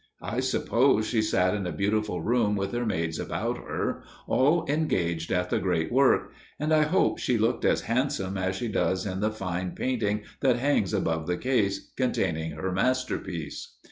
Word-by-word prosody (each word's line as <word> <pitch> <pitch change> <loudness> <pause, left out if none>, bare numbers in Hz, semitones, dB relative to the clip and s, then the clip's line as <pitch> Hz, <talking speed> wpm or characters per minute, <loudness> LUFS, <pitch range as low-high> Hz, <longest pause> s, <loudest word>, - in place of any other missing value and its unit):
I 120 - -2
suppose 130 -2 +2
she 110 -1 +1
sat 90 -4 +2
in 100 -3 -2
a - - -2
beautiful 100 +1 -1
room 110 +1 +2
with 100 -1 -2
her 120 -1 -1
maids 80 -5 -1
about - - -2
her, - - -3 0.2
all 155 +5 +3
engaged 90 - 0
at 90 -1 0
the - - +2
great 85 -4 0
work, 135 +2 +3 0.3
and 155 +2 +1
I 155 - +5
hope 170 +5 +2
she 125 - +1
looked 115 +2 +1
as - - +3
handsome 115 -6 -1
as 95 0 -1
she 120 +5 -3
looks 95 -3 0
in 95 -2 -3
the 105 +2 +1
fine 90 -4 -4
painting 105 -5 -1 0.2
that 130 -3 +3
hangs 125 -7 +1
above 80 -1 -1
the 90 0 0
case 110 -7 0
containing 80 0 -1
her 90 +5 -3
masterpiece. 95 - -2
105 Hz, 175 wpm, -27 LUFS, 90-125 Hz, 0.3 s, I